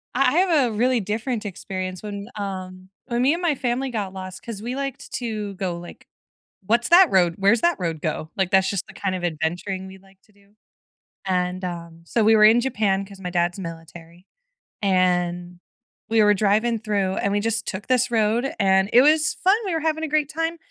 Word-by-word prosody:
I 270 - +3
I - - +2
have 320 -9 +3
a - - -6
really 250 +3 +2
different 220 +3 -3
experience 185 -1 -5
when, 200 -1 -6
um 185 -2 -6 0.2
when 240 0 -1
me 270 +4 +4
and 340 - -3
my 335 -5 +1
family 260 +1 -2
got 205 -6 -4
lost- 185 -1 -8
'cause 225 -4 -7
we 240 +3 -4
liked 275 0 -5
to 215 -4 -4
go, 185 -3 -3
like, 175 0 -12 0.6
"What's 235 +4 +2
that 355 +1 +7
road? 175 -3 +3
Where's 200 +4 +3
that 345 -2 +2
road 165 -4 -3
go?" 155 0 -3
like, 190 -2 +1
that's 190 -1 +4
just 200 - -3
the - - -13
kind 195 -2 -3
of 180 - -5
adventuring 175 +4 -3
we 190 0 -11
like 195 0 -23
to - - -28
do- 200 +1 -27 0.7
and, 180 0 -1
uh, 170 -2 -5 0.2
so, 225 +6 0
we 220 +1 +5
were 215 - +5
in 225 +3 +6
Japan, 205 -6 0
'cause 195 -1 -13
my 180 - -4
dad's 175 0 0
military, 165 0 -10 0.6
and 180 -2 0 0.5
we 225 -1 +3
were 210 0 +5
driving 215 +3 +1
through 200 -3 -1
and 200 - -1
we 205 - +1
just 225 +1 -1
took 190 +2 -5
this 255 -1 +2
road, 230 +3 +1
and 190 0 +3
it 245 - +7
was 305 +2 +3
fun, 380 +3 +3
we 365 - -1
were 325 - 0
having 315 0 -1
a - - -3
great 300 -1 +1
time, 325 +1 -2
200 Hz, 210 wpm, -23 LUFS, 185-240 Hz, 0.7 s, that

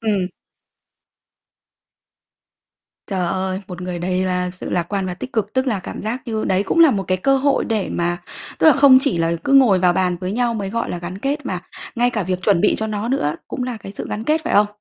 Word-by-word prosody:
Ừm. 200 -5 0 2.8
Trời 185 -3 -1
ơi, 190 +1 -2
một 180 -2 -7
người 180 -1 -4
đầy 185 +1 -1
là 180 -1 -1
sự 185 - -7
lạc 175 - +1
quan 195 -2 -2
và 180 - -3
tích 255 +8 -8
cực, 210 -2 -1
tức 260 +1 0
là 220 -6 0
cảm - - -7
giác 230 +5 -3
như 220 -2 -2
đấy 190 +1 +1
cũng 335 - -1
là 325 -4 +8
một 200 -4 -1
cái 185 - +2
cơ 270 +8 +3
hội 275 +1 +1
để 220 -4 -1
mà 175 0 -1 0.4
tức - - +4
là 315 - +9
không 275 -1 +7
chỉ 275 - +1
là 165 0 +1
cứ - - 0
ngồi 250 -9 +6
vào 180 -1 +3
bàn 180 -1 0
với 185 +1 -3
nhau 235 +1 0
mới 200 -3 -3
gọi 230 +1 -2
là 175 - -3
gắn 180 +2 -6
kết, 280 +5 -2
mà 185 -6 -3 0.3
ngay 245 0 +2
cả 220 -4 -1
việc 185 0 -3
chuẩn 195 -4 +3
bị 210 - +3
cho 220 - -1
nó 215 +1 -3
nữa 195 - 0
cũng 250 - -4
là 245 -2 -3
cái 195 -2 -9
sự - - -6
gắn 215 - -4
kết, 310 +4 +2
phải 330 - -1
không? 205 +1 +5
205 Hz, 245 wpm, -20 LUFS, 185-245 Hz, 2.8 s, là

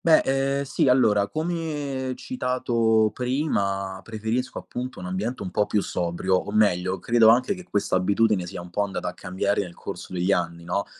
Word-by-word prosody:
Beh 160 -2 +6
ehm 135 +1 +1
sì, 140 0 0
allora 105 -6 +4
come 150 - -3
citato 115 - +1
prima 100 -8 -1
preferisco 115 +3 -3
appunto 125 +1 -6
un - - -7
ambiente 100 +7 -3
un 90 - -5
po' 105 - +1
più 105 - +1
sobrio, 90 +2 0
o 105 - -4
meglio 95 -3 +2
credo 115 -1 +4
anche 125 - +4
che 185 - -9
questa 100 -2 +1
abitudine 100 0 +2
sia 85 - -6
un 90 - -12
po' 105 - 0
andata 100 -1 -2
a - - -8
cambiare 95 +3 -1
nel 90 -3 -7
corso - - -8
degli 90 +2 +1
anni, 85 -3 -1
no, 90 +4 -1
110 Hz, 180 wpm, -25 LUFS, 95-130 Hz, -, Beh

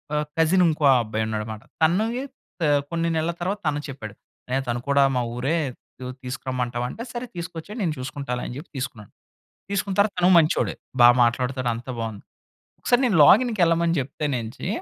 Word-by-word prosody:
ఆహ్, 150 0 0
కజినుంకో 165 -1 +3 0.2
అబ్బాయి 110 -1 -2
ఉన్నాడనమాట. 110 0 -4 0.2
తనవి 215 +10 +2 0.4
త 160 - +3 0.2
కొన్ని 170 0 -1
నెలల 160 +1 0
తర్వాత 185 +4 -1
తను 150 -1 +1
చెప్పాడు. 120 -7 -8 0.3
అన్నయ్య 130 +1 -1
తను 120 0 -1
కూడా 140 0 +4
మా 125 - +2
ఊరే 135 +7 0 0.5
యు 125 - -5 0.2
తీసుకురమ్మంటావా 125 -1 -3
అంటే, 230 - -7
సరే 240 +1 -5
తీసుకొచ్చెయి, 170 +3 -7
నేను 170 -5 0
చూసుకుంటాలే 130 -1 -4
అని 125 - -7
చెప్పి 150 - -9
తీసుకున్నాను. 115 -6 -6 0.6
తీసుకున్న 200 0 -1
తర్వాత 205 0 +3
తను 180 +1 +4
మంచోడే. 160 0 +3 0.3
బా 120 - +10
మాట్లాడుతాడు, 125 +1 +1
అంతా 120 +3 -6
బావుంది. 110 -3 -5 0.6
ఒకసారి 245 +1 +2
నేను 225 -6 +2
లాగిన్‍‌కెళ్ళమని 170 - +4
చెప్తేనేంచి, 130 -4 -3
145 Hz, 155 wpm, -24 LUFS, 125-170 Hz, 0.6 s, బా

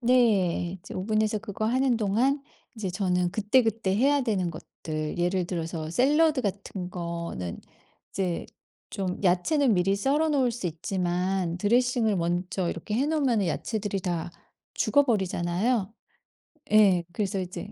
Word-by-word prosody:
네 205 -8 +2
이제 - - -10
오븐에서 215 +2 0
그거 215 0 -5
하는 255 +2 +2
동안 230 +7 +1 0.4
이제 215 -4 -3
저는 180 -1 0
그때그때 220 -2 +2
해야 280 +5 +3
되는 205 -8 0
것들, 155 -1 -6
예를 180 +1 +1
들어서 165 -2 -4
샐러드 290 - +3
같은 195 -3 -4
거는 170 - -5 0.5
이제 180 -3 -2 0.4
좀 185 -3 -3
야채는 220 - +3
미리 195 +2 +2
썰어 285 +9 +1
놓을 265 -5 +2
수 220 -6 -3
있지만 180 +1 -1
드레싱을 235 +1 +2
먼저 175 +1 -1
이렇게 190 +5 -5
해 265 +6 +1
놓으면은 260 - +1
야채들이 205 +3 -2
다 175 -2 -3 0.4
죽어버리잖아요? 205 -3 +1 0.8
예, 200 -5 +5
그래서 195 -1 -1
이제 185 +3 -6
195 Hz, 295 characters per minute, -27 LUFS, 180-235 Hz, 0.8 s, 예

